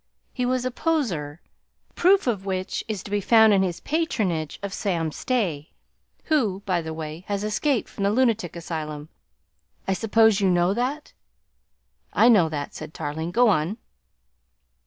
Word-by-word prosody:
He 250 -1 -1
was 255 0 0
a 255 - -1
poseur, 210 - -2 0.5
proof 385 +3 +4
of 215 -6 -1
which 185 -1 -3
is 210 -4 -4
to 200 - -10
be 205 0 0
found 220 +1 +6
in 195 - +4
his 175 -3 -1
patronage 215 - -1
of 200 -1 -4
Sam 170 -7 -1
Stay 175 - -2 0.5
who, 220 - 0
by 180 -3 0
the 160 0 -6
way, 160 +1 -6
has 200 0 -2
escaped 235 +4 0
from 200 - -4
the - - +3
lunatic 225 -7 +1
asylum; 155 -3 -5 0.8
I 195 - +2
suppose 220 0 +3
you 195 - +3
know 175 +1 +3
that?" 260 +7 -3 1.0
"I 235 - +5
know 190 -9 +5
that," 145 -2 -5
said 155 0 -9
Tarling. 160 +3 -4
"Go 235 +5 +4
on." 180 +2 0
195 Hz, 155 wpm, -24 LUFS, 165-235 Hz, 1.0 s, found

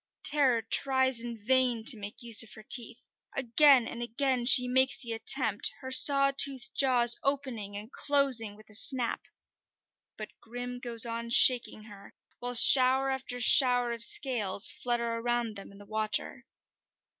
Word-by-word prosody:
Terror 265 -6 +1
tries 260 +2 -1
in 235 0 -8
vain 245 +1 -2
to 250 - +4
make 210 +3 -11
use 230 -3 +2
of 225 - -4
her 215 - -16
teeth. 240 +2 -4 0.3
Again 270 0 +1
and 240 - -9
again 245 +1 -4
she 250 0 +5
makes 260 +1 0
the 235 -3 -7
attempt, 225 -2 0
her 260 -1 -10
saw 275 +1 +5
toothed 270 -2 0
jaws 245 -3 +2
opening 255 -8 -5
and 215 +4 -11
closing 270 -7 -1
with 215 0 -21
a - - -15
snap. 240 +2 -2 1.0
But 215 -1 -10
Grim 245 +1 -10
goes 235 -2 +2
on 235 0 -8
shaking 240 -2 +2
her, 205 -2 -18 0.2
while 245 0 -6
shower 260 +2 +5
after 260 -2 -7
shower 245 -1 +4
of 235 -1 -8
scales 230 -6 +1
flutter 235 -1 -5
around 240 -2 -5
them 200 - -13
in 200 - -19
the 205 - -17
water. 215 +5 -6
240 Hz, 155 wpm, -26 LUFS, 225-260 Hz, 1.0 s, she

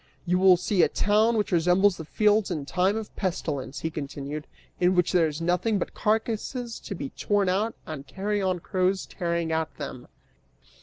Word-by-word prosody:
You 180 +1 +2
will 185 -1 +7
see 180 +1 +1
a - - +4
town 215 +3 +2
which 210 - 0
resembles 180 +3 +3
the 160 - -7
fields 210 +4 +2
in 155 -6 -3
time 185 +8 +1
of 220 -2 -7
pestilence," 145 -8 -3
he 160 - -2
continued, 145 0 -5 0.3
"in 180 +1 +3
which 180 -1 +2
there 175 -3 +4
is 150 0 -5
nothing 180 +6 +1
but 190 - -3
carcasses 225 +2 -1
to 200 - -6
be 140 -5 -5
torn 205 -2 +1
at 210 +5 0
and 150 -3 -7
carrion 190 -2 -1
crows 185 +2 0
tearing 170 -2 -2
at 160 0 -2
them." 130 -4 -7
180 Hz, 175 wpm, -26 LUFS, 160-205 Hz, 0.3 s, will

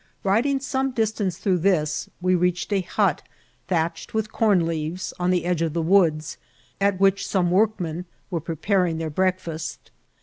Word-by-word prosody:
Riding 240 +8 +2
some 270 0 -1
distance 215 -6 -1
through 190 -3 +1
this, 160 -4 +1
we 185 +1 +1
reached 180 +2 +1
a 195 - +2
hut, 185 -2 0 0.5
thatched 165 +2 -2
with 220 0 -1
corn 200 -7 +3
leaves, 165 +2 -3
on 180 0 +1
the 180 -1 +1
edge 175 -2 0
of 165 -2 0
the 170 - 0
woods, 165 -4 +2 0.4
at 200 -2 +2
which 195 0 +3
some 180 -3 +1
workmen 180 -4 +1 0.3
were 170 -3 -1
preparing 170 +2 0
their 160 -1 -3
breakfast. 170 -2 -2
180 Hz, 160 wpm, -24 LUFS, 165-200 Hz, 0.5 s, corn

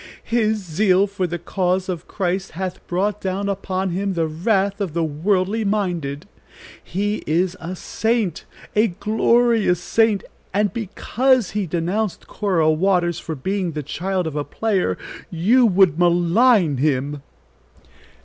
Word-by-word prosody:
"His 220 -2 +1
zeal 190 +1 +2
for 195 -2 -2
the 175 +1 -3
cause 180 +2 -1
of 180 -2 -4
Christ 190 0 -2
hath 185 +2 -5
brought 200 +3 -1
down 195 +1 -2
upon 190 -1 -2
him 195 +2 -2
the 165 -1 +1
wrath 195 +5 0
of 175 -6 -3
the 170 - +1
worldly 185 +7 0
minded. 175 -9 -2 0.6
He 205 +4 -1
is 175 +3 +1
a 175 +3 -5
saint 220 -2 -1 0.3
a 215 +2 +4
glorious 220 0 +2
saint, 220 +2 +2 0.3
and 205 0 +1
because 235 +2 +1
he 205 -2 -2
denounced 180 +5 -2
Cora 175 -7 +1
Waters 175 0 +1
for 160 - -5
being 185 +4 -2
the 150 -1 -4
child 185 +5 -2
of 160 -2 -4
a 145 - -1
player, 190 - -1 0.3
you 225 +9 +4
would 185 -5 +4
malign 175 - +4
him." 145 +1 0
185 Hz, 140 wpm, -21 LUFS, 170-210 Hz, 0.6 s, a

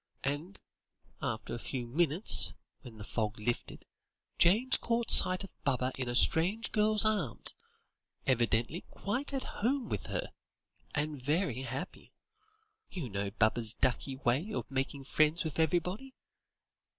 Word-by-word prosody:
And, 145 +8 -3 0.6
after 110 -1 -3
a 120 - -4
few 125 0 -3
minutes, 160 - +1 0.3
when 120 -5 -12
the 105 - -8
fog 110 0 -2
lifted, 120 +3 -3 0.5
James 225 +10 +4
caught 235 -1 -1
sight 185 +1 +8
of 195 - -10
Baba 130 -2 +1
in 130 -2 -3
a 120 - -2
strange 185 - +3
girl's 215 0 +4
arms, 200 - -1 0.7
evidently 120 +4 +1
quite 250 +9 -3
at 270 -1 -2
home 250 +3 -1
with - - -3
her, - - -3 0.6
and 150 -2 -2
very 145 - 0
happy. 135 +7 -7 0.8
You 160 -10 -5
know 100 0 -2
Baba's 110 +2 +2
ducky 130 +1 0
way 135 - 0
of 205 - -4
making 135 +1 -2
friends 155 +4 +2
with 160 -1 -4
everybody. 180 - 0
150 Hz, 135 wpm, -32 LUFS, 120-195 Hz, 0.8 s, sight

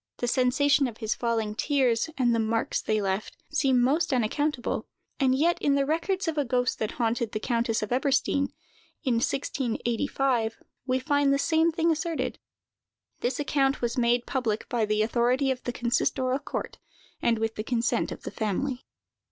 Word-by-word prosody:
The 245 - -2
sensation 270 +3 +3
of 230 -3 -8
his 220 -2 -1
falling 225 -3 -1
tears, 255 +1 +1
and 245 -3 +3
the 230 - +1
marks 225 +1 0
they 215 0 0
left, 195 +1 -2
seem 270 -4 +3
most 295 +7 +2
unaccountable; 260 +2 -1 0.3
and 260 -2 +3
yet, 335 +5 +2
in 280 -1 +3
the 280 0 +2
records 345 +5 -1
of 320 -2 0
a - - +3
ghost 250 -1 0
that 215 - -2
haunted 230 -1 -1
the 215 - -1
countess 230 -1 0
of 215 - -5
Eberstein, 275 +2 +1 0.5
in 250 -5 +2
1685, 245 -2 -1 0.3
we 255 0 +2
find 285 +1 +2
the 275 - +3
same 320 +3 +2
thing 330 0 +2
asserted. 325 0 -2 0.8
This 250 +3 -1
account 275 -1 +1
was 235 +1 0
made 240 -1 +2
public 230 -5 -1
by 235 -4 +1
the 215 0 +1
authority 245 +4 +2
of 255 -1 -3
the 245 - -1
consistorial 255 +2 0
court, - - -5 0.4
and 230 -1 +2
with 225 0 -1
the 215 - -4
consent 235 +1 0
of - - -8
the - - -5
family. 245 +5 -2
250 Hz, 170 wpm, -27 LUFS, 230-280 Hz, 0.8 s, sensation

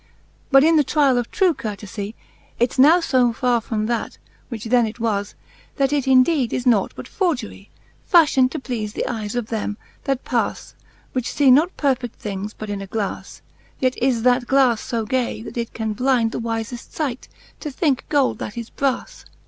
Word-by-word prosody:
But 270 -1 +6
in 325 +1 +5
the 300 - +5
triall 275 -3 +3
of 240 - -4
true 375 -4 +2
courtefie, 210 -2 -6 0.4
Its 240 +2 0
now 310 +7 +7
fb 250 -7 +2
farre 245 -1 +1
from 215 -1 -2
that, 235 +1 -2 0.3
which 230 -4 -6
then 240 0 +3
it 220 +3 -8
was, 205 -3 -1 0.4
That 275 0 +1
it 280 -3 0
indeed 260 -1 +4
is 250 - -2
nought 225 -6 +3
but - - -8
forgerie, 250 - -2 0.4
Fafhion'd 295 -7 +5
to 315 - -3
pleafe 225 -6 -4
the - - -2
eies 220 -3 -4
of 240 -3 -2
them, 210 -2 -3 0.3
that 270 -2 -1
pas, - - -2 0.4
Which 255 +1 -3
lee 275 -3 +6
not 310 +8 +4
perfed: 255 -5 0
things 205 0 -6
but 215 -1 -6
in 200 -1 -4
a 195 - -7
glas 205 0 -5 0.2
\ - - -33
Yet 255 -1 +1
is 245 -3 +1
that 245 0 +3
glas 260 -4 +2
io 230 -2 -1
gay, 245 -2 -1
that - - -9
it 235 -1 -3
can 220 -1 -2
blynd 245 -1 +1
The - - -4
wiieft 230 +1 -3
fight, 270 -6 -4 0.3
to 300 - -5
thinke 280 -2 -1
gold 285 -3 +2
that 210 - -6
is 235 -1 -6
bras. 275 -2 -2
245 Hz, 190 wpm, -21 LUFS, 225-270 Hz, 0.4 s, now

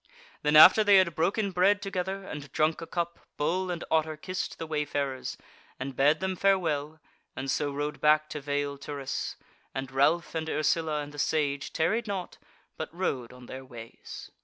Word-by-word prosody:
Then 150 +1 +2
after 185 +7 +10
they 205 -1 +7
had 185 -3 +4
broken 195 +6 0
bread 190 +3 +3
together 195 -1 -3
and 145 -7 -8
drunk 155 +2 +1
a 165 - -6
cup 170 -1 -3 0.2
Bull 180 +5 0
and 175 -1 -3
Otter 155 -1 +1
kissed 185 +6 -4
the 165 - -5
wayfarers, 145 -3 -2 0.4
and 135 +1 -5
bade 145 +6 +3
them 190 0 -1
farewell 160 -6 +1 0.4
and 135 0 -2
so 145 -1 0
rode 145 +1 -4
back 155 0 +4
to 150 - -5
Vale 145 0 -2
Turris, 140 -1 -4 0.4
and 135 0 -4
Ralph 140 +6 +2
and 160 -1 -3
Ursula 155 -1 +1
and 145 0 -7
the 145 - -9
Sage 145 -2 0
tarried 220 +8 0
not 195 -3 -4 0.4
but 160 - -5
rode 140 -9 -2
on 125 0 -13
their 130 +2 -8
ways. 120 -3 -10
155 Hz, 175 wpm, -28 LUFS, 145-180 Hz, 0.4 s, after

